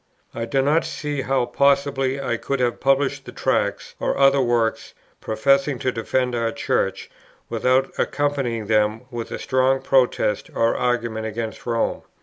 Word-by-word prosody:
I 115 Hz, -, -3 dB
do 135 Hz, +3 st, +1 dB
not 150 Hz, +4 st, +3 dB
see 145 Hz, -2 st, -3 dB
how 135 Hz, -1 st, +1 dB
possibly 140 Hz, +1 st, +1 dB
I 135 Hz, -, -1 dB
could 140 Hz, -1 st, -3 dB
have 120 Hz, -1 st, 0 dB
published 135 Hz, +1 st, +1 dB
the -, -, -8 dB
Tracts, -, -, -1 dB
or -, -, -1 dB
other 135 Hz, 0 st, +5 dB
works 120 Hz, -2 st, 0 dB, 0.2 s
professing 135 Hz, +4 st, +1 dB
to 130 Hz, -, -1 dB
defend 125 Hz, +2 st, -1 dB
our 115 Hz, -1 st, 0 dB
Church, -, -, -1 dB, 0.4 s
without 130 Hz, +3 st, +1 dB
accompanying 135 Hz, -6 st, -1 dB
them 105 Hz, +1 st, +1 dB
with 120 Hz, -2 st, -5 dB
a -, -, -4 dB
strong 130 Hz, +1 st, +1 dB
protest 130 Hz, -6 st, +1 dB
or 115 Hz, 0 st, +2 dB
argument 115 Hz, -3 st, -1 dB
against 110 Hz, +1 st, -5 dB
Rome. 115 Hz, -1 st, 0 dB
130 Hz, 150 wpm, -22 LUFS, 115-135 Hz, 0.4 s, other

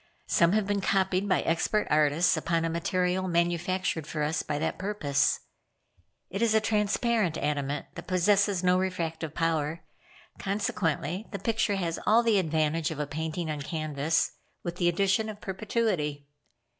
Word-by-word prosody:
Some 170 Hz, 0 st, +3 dB
have 215 Hz, -1 st, +2 dB
been 200 Hz, 0 st, 0 dB
copied 190 Hz, 0 st, +1 dB
by 185 Hz, -, +3 dB
expert 170 Hz, +6 st, +1 dB
artists 150 Hz, +3 st, +4 dB
upon 165 Hz, -1 st, 0 dB
a 165 Hz, -, -1 dB
material 180 Hz, +2 st, 0 dB
manufactured 170 Hz, -1 st, 0 dB
by 155 Hz, -, -2 dB
us 150 Hz, +3 st, 0 dB
for 145 Hz, -, -3 dB
that 160 Hz, -, -2 dB
purpose. 185 Hz, -9 st, +1 dB, 0.9 s
It 195 Hz, -, -3 dB
is 225 Hz, -2 st, +3 dB
a -, -, +6 dB
transparent 215 Hz, -3 st, +1 dB
adamant 145 Hz, -1 st, -2 dB
that -, -, -9 dB
possesses 195 Hz, +1 st, +2 dB
no 180 Hz, 0 st, +4 dB
refractive 165 Hz, -4 st, -3 dB
power, 160 Hz, -1 st, 0 dB, 0.6 s
consequently 195 Hz, -1 st, -1 dB
the 200 Hz, -, -3 dB
picture 220 Hz, -1 st, 0 dB
has 170 Hz, -3 st, -2 dB
all 225 Hz, +3 st, +5 dB
the 225 Hz, -4 st, +4 dB
advantage 160 Hz, -1 st, 0 dB
of 160 Hz, -2 st, -6 dB
a 150 Hz, -, 0 dB
painting 160 Hz, +2 st, -3 dB
on 150 Hz, -1 st, -4 dB
canvas, 155 Hz, 0 st, 0 dB, 0.3 s
with 175 Hz, 0 st, -4 dB
the 175 Hz, -1 st, +3 dB
addition 200 Hz, +5 st, +1 dB
of 210 Hz, -1 st, -7 dB
perpetuity. 190 Hz, -8 st, -1 dB
175 Hz, 155 wpm, -28 LUFS, 160-200 Hz, 0.9 s, a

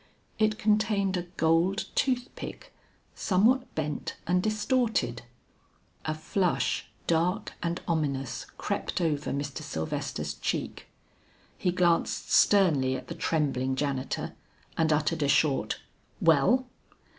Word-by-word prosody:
It 215 Hz, 0 st, +2 dB
contained 210 Hz, -3 st, +2 dB
a 175 Hz, -1 st, -3 dB
gold 165 Hz, +5 st, +2 dB
tooth 250 Hz, -2 st, +1 dB
pick -, -, -8 dB, 0.4 s
somewhat 240 Hz, +7 st, +2 dB
bent 150 Hz, -1 st, -3 dB
and 180 Hz, +1 st, +2 dB
distorted. 215 Hz, -, 0 dB, 0.8 s
A 155 Hz, -, -1 dB
flush 155 Hz, -4 st, 0 dB, 0.2 s
dark 180 Hz, +6 st, +1 dB
and 170 Hz, +1 st, -1 dB
ominous 140 Hz, -6 st, -1 dB
crept 200 Hz, -2 st, -2 dB
over 150 Hz, -4 st, 0 dB
Mr. 140 Hz, -1 st, -3 dB
Sylvester's 80 Hz, 0 st, -3 dB
cheek. -, -, -3 dB, 0.7 s
He 180 Hz, -, 0 dB
glanced 175 Hz, -2 st, +1 dB
sternly 150 Hz, -10 st, +4 dB
at -, -, -7 dB
the -, -, -3 dB
trembling 140 Hz, -6 st, 0 dB
janitor, 135 Hz, -1 st, -2 dB, 0.4 s
and 160 Hz, -1 st, +2 dB
uttered 150 Hz, +1 st, +1 dB
a 145 Hz, -, +2 dB
short, 140 Hz, 0 st, +2 dB, 0.4 s
"Well?" 165 Hz, -, +4 dB
165 Hz, 110 wpm, -28 LUFS, 145-205 Hz, 0.8 s, sternly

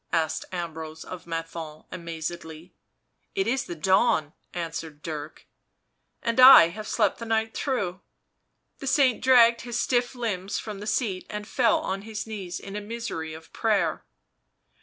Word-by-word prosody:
asked 160 Hz, -2 st, 0 dB
Ambrose 160 Hz, -3 st, -5 dB
of 180 Hz, -2 st, -9 dB
Menthon 165 Hz, -2 st, -6 dB
amazedly. 165 Hz, 0 st, -6 dB, 0.6 s
"It 385 Hz, -1 st, +1 dB
is 260 Hz, +1 st, 0 dB
the 175 Hz, -, -6 dB
dawn," 165 Hz, -2 st, +2 dB, 0.2 s
answered 165 Hz, -3 st, -5 dB
Dirk. 155 Hz, -1 st, -6 dB, 0.4 s
" -, -, -50 dB
And 230 Hz, +1 st, 0 dB
I 255 Hz, -10 st, +10 dB
have 215 Hz, +4 st, -8 dB
slept -, -, +1 dB
the 230 Hz, -, -5 dB
night 225 Hz, 0 st, 0 dB
through." 200 Hz, -9 st, -2 dB, 0.8 s
The 275 Hz, -, -6 dB
saint 260 Hz, -3 st, +3 dB
dragged 235 Hz, -3 st, +6 dB
his 240 Hz, 0 st, -3 dB
stiff 245 Hz, 0 st, +1 dB
limbs 205 Hz, -5 st, -2 dB
from 210 Hz, -3 st, -6 dB
the 210 Hz, -, -7 dB
seat 210 Hz, -4 st, -1 dB
and 210 Hz, 0 st, -5 dB
fell 230 Hz, -3 st, +3 dB
on 195 Hz, +1 st, -3 dB
his 215 Hz, 0 st, -5 dB
knees 195 Hz, -5 st, -5 dB
in 200 Hz, 0 st, -8 dB
a 210 Hz, -, -3 dB
misery 205 Hz, -8 st, -5 dB
of 160 Hz, 0 st, -14 dB
prayer. 215 Hz, -3 st, +1 dB
195 Hz, 155 wpm, -26 LUFS, 165-230 Hz, 0.8 s, I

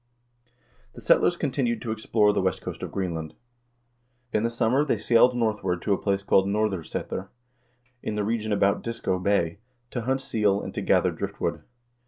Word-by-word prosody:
The 120 Hz, -, -11 dB
settlers 175 Hz, +9 st, +4 dB
continued 130 Hz, -6 st, 0 dB
to 115 Hz, -, -3 dB
explore 110 Hz, -1 st, +2 dB
the -, -, +1 dB
west 95 Hz, 0 st, -1 dB
coast -, -, -6 dB
of -, -, -5 dB
Greenland. 85 Hz, -5 st, -3 dB, 1.0 s
In 105 Hz, -, +2 dB
the 115 Hz, -, +1 dB
summer 120 Hz, +4 st, +2 dB
they 150 Hz, -, 0 dB
sailed 125 Hz, +1 st, +4 dB
northward 105 Hz, -6 st, 0 dB
to 105 Hz, -, +2 dB
a -, -, -2 dB
place 100 Hz, -1 st, 0 dB
called 95 Hz, -1 st, +3 dB
Nor'Srsetur, 100 Hz, -2 st, -2 dB, 0.7 s
in 105 Hz, -, -3 dB
the 105 Hz, -, 0 dB
region 110 Hz, 0 st, -1 dB
about 100 Hz, -1 st, +2 dB
Disco 115 Hz, -5 st, -2 dB
Bay, 100 Hz, -1 st, +1 dB, 0.3 s
to 120 Hz, -, -3 dB
hunt 130 Hz, +3 st, 0 dB
seal, 105 Hz, -6 st, +1 dB
and -, -, -6 dB
to -, -, -3 dB
gather -, -, +3 dB
driftwood. -, -, -3 dB
105 Hz, 170 wpm, -26 LUFS, 100-115 Hz, 1.0 s, settlers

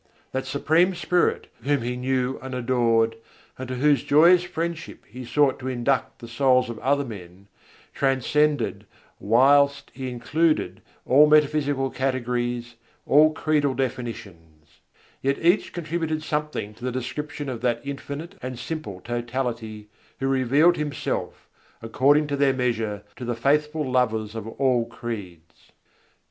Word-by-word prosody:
That 130 Hz, 0 st, -3 dB
Supreme 160 Hz, +7 st, +2 dB
Spirit 175 Hz, 0 st, +1 dB, 0.2 s
Whom 140 Hz, 0 st, 0 dB
he 125 Hz, +1 st, -2 dB
knew 130 Hz, +1 st, -1 dB
and 130 Hz, -1 st, -6 dB
adored, 115 Hz, -2 st, +1 dB, 0.4 s
and 130 Hz, -, -5 dB
to 130 Hz, -, -4 dB
Whose 145 Hz, +2 st, +3 dB
joyous 170 Hz, +5 st, +5 dB
friendship 170 Hz, -1 st, -5 dB
he 125 Hz, +4 st, -9 dB
sought 140 Hz, +2 st, +2 dB
to 130 Hz, -, -6 dB
induct 130 Hz, +1 st, -1 dB
the 115 Hz, -, -10 dB
souls 125 Hz, 0 st, +2 dB
of 110 Hz, -, -8 dB
other 140 Hz, +1 st, +1 dB
men, 95 Hz, -4 st, -11 dB, 0.5 s
transcended 145 Hz, +3 st, 0 dB, 0.3 s
whilst 140 Hz, +5 st, +3 dB
He 130 Hz, -1 st, -5 dB
included 125 Hz, -, 0 dB, 0.2 s
all 145 Hz, +4 st, +6 dB
metaphysical 145 Hz, -3 st, +2 dB
categories, 120 Hz, -2 st, -2 dB, 0.3 s
all 155 Hz, +2 st, +5 dB
credal 150 Hz, -3 st, 0 dB
definitions; 100 Hz, -, -6 dB, 0.4 s
yet 140 Hz, +1 st, 0 dB
each 175 Hz, +4 st, +2 dB
contributed 160 Hz, -2 st, -3 dB
something 150 Hz, -9 st, -3 dB
to 110 Hz, -, -16 dB
the 125 Hz, -, -1 dB
description 145 Hz, +4 st, -5 dB
of 125 Hz, -4 st, -5 dB
that 120 Hz, -2 st, +1 dB
Infinite 140 Hz, +5 st, -6 dB
and 130 Hz, -1 st, -5 dB
Simple 115 Hz, -, -6 dB
Totality 120 Hz, -2 st, -4 dB, 0.3 s
Who 135 Hz, -, -1 dB
revealed 135 Hz, +6 st, +3 dB
Himself, 150 Hz, -1 st, -4 dB, 0.3 s
according 140 Hz, +6 st, +3 dB
to 145 Hz, -1 st, -2 dB
their 140 Hz, -1 st, +3 dB
measure, 115 Hz, -5 st, -2 dB
to 130 Hz, -, -7 dB
the 120 Hz, -1 st, -2 dB
faithful 150 Hz, +4 st, +1 dB
lovers 110 Hz, -4 st, 0 dB
of 110 Hz, -1 st, -6 dB
all 125 Hz, 0 st, +1 dB
creeds. 95 Hz, -9 st, -9 dB
130 Hz, 135 wpm, -24 LUFS, 120-145 Hz, 0.5 s, all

